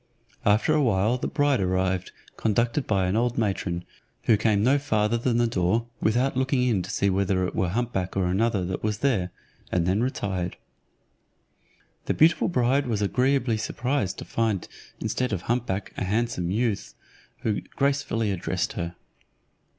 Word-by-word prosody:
After 105 +9 +4
a 155 - +3
while 115 0 +2
the - - -2
bride 145 -3 +2
arrived, 95 0 0 0.2
conducted 120 +5 0
by 95 -3 +2
an 90 +2 0
old 120 +1 +1
matron, 95 -5 -1 0.4
who 115 - +5
came 105 -1 +2
no 135 +4 +4
farther 110 -5 +1
than 120 0 +1
the 120 - +3
door, 110 +1 +1 0.2
without 125 +5 +2
looking 130 0 +1
in 115 -7 +2
to 90 - -7
see 100 - +1
whether 95 -1 +1
it - - -4
were 90 - 0
hump 120 +5 -1
back 95 0 -2
or 95 - +2
another 100 +1 +1
that 95 +1 -3
was 105 -1 -1
there, 100 -10 +2 0.4
and 90 -2 +1
then 95 +4 +2
retired. 95 -8 -2 1.5
The - - 0
beautiful 165 +2 +4
bride 135 -3 +2
was 105 -3 0
agreeably 125 +1 +2
surprised 120 -2 -1
to - - -7
find 110 -5 -1 0.3
instead 125 -1 -1
of 95 -3 -3
hump 120 +1 0
back 95 +1 -3
a - - -1
handsome 105 -2 -1
youth, 110 +1 -1 0.5
who 105 -2 0
gracefully 135 -6 0
addressed 95 -1 -2
her. 85 0 -4
110 Hz, 165 wpm, -26 LUFS, 95-125 Hz, 1.5 s, who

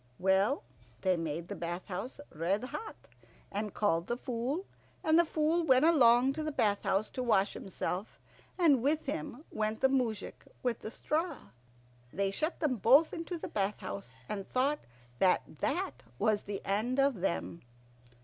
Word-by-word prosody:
Well, 190 +2 +2 0.4
they 185 -1 +3
made 165 0 -3
the - - -5
bath 175 +2 -4
house 210 +8 -5
red 180 +7 0
hot, 435 - -6 0.6
and 205 +1 -2
called 175 -5 +1
the 240 - -1
Fool, 255 +9 -2 0.4
and 315 +1 +5
the 345 - +5
Fool 320 +2 +1
went 265 -2 +5
along 260 -5 +6
to 310 - -3
the 310 - -2
bath 205 -7 +1
house 205 +3 +1
to 255 - -3
wash 210 -5 +2
himself, 190 +1 -4 0.4
and 305 -9 +5
with 300 +5 +1
him 290 0 -4
went 215 0 -1
the 265 - +4
moujik 240 -6 -1 0.2
with 245 -3 0
the - - -6
straw. 310 +6 -2 0.6
They 195 0 0
shut 310 - -2
them 280 -6 +1
both 265 - +5
into 340 +1 -4
the - - -5
bath 200 0 -1
house, 100 +6 -6
and 195 -2 -4
thought 275 +4 +1 0.4
that 185 -1 +4 0.2
that 130 -1 -1 0.2
was 215 - +2
the 200 -1 -5
end 220 +6 0
of 275 -8 +2
them. 170 -2 -2
230 Hz, 165 wpm, -32 LUFS, 195-285 Hz, 0.6 s, along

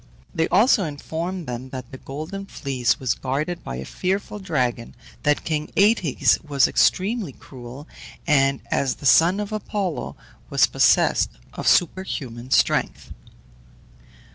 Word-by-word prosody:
They 160 - +1
also 210 +2 +4
informed 165 +4 -5
them 125 +1 -6
that 130 -2 -8
the 130 - -9
Golden 160 +8 -7
Fleece 130 -8 -1
was 125 -4 0
guarded 150 +7 -3
by - - -5
a 65 +2 -6
fearful 195 - -3
dragon, 125 -11 -2 0.3
that 150 0 +1
king 155 -1 -2
Aëtes 200 - +3
was 145 -3 +3
extremely 195 - +1
cruel, 130 +4 -11 0.4
and, 135 -3 +2
as 135 -2 +1
the - - -11
son 170 +7 +5
of 210 0 -4
Apollo, 205 -5 -3 0.3
was - - +4
possessed - - +3 0.2
of - - -5
superhuman 135 -9 0
strength. - - +1
150 Hz, 130 wpm, -23 LUFS, 130-185 Hz, 0.4 s, son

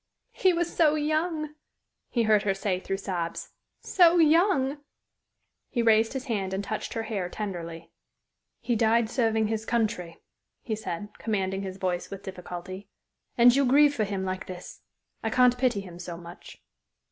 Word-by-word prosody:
"He 375 - +3
was 345 -1 -1
so 310 -3 +4
young!" 310 0 -1 0.6
he 235 - +1
heard 215 -2 +4
her 195 -2 0
say 195 -2 -1
through 195 +1 -3
sobs. 175 -4 -4 0.3
"So 350 -2 +5
young!" 310 -4 +3 0.9
He 240 -3 0
raised 225 0 +4
his 265 0 -4
hand 195 -6 -2
and 195 - -3
touched 215 +2 -4
her 225 - -1
hair 205 -5 -3
tenderly. 170 -5 -6 0.7
"He 240 - 0
died 225 0 +2
serving 225 -3 +1
his 220 0 -2
country," 215 -8 -1 0.5
he 220 - -2
said, 205 -1 -5
commanding 195 -3 -1
his 190 -1 -6
voice 180 -2 -2
with 195 0 -8
difficulty. 185 +1 -8 0.5
"And 240 +1 +7
you 280 - +4
grieve 285 +3 +5
for 225 - 0
him 195 -2 -3
like 185 0 -4
this! 185 0 -9 0.4
I 225 - -1
can't 250 +1 +4
pity 245 -5 +1
him 175 -3 -11
so 175 -1 -6
much." 170 0 -12
220 Hz, 160 wpm, -27 LUFS, 190-255 Hz, 0.9 s, And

